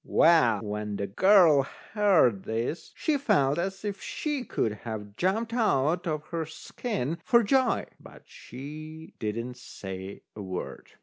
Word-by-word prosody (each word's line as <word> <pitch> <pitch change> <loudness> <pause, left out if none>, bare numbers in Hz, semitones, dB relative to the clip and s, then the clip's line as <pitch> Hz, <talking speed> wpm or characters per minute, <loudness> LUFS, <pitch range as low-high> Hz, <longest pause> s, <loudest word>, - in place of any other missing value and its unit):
Well, 160 -9 +4
when 105 0 -4
the 100 - -2
girl 170 - +6 0.3
heard 185 - +4
this, 115 +9 -3
she 300 -3 0
felt 145 - +2
as 195 +3 -3
if 200 -2 -4
she 295 -4 -3
could 110 - -1
have 105 -3 -6
jumped 220 - 0
out 175 - +1
of 155 -1 -2
her 165 -2 -3
skin 165 - -4
for 235 0 +4
joy, 255 +3 +2
but - - -14
she 155 +5 -10
didn't 115 +3 -3
say 95 -5 -8
a 105 - -7
word. 95 -2 -6
155 Hz, 140 wpm, -28 LUFS, -, 0.3 s, girl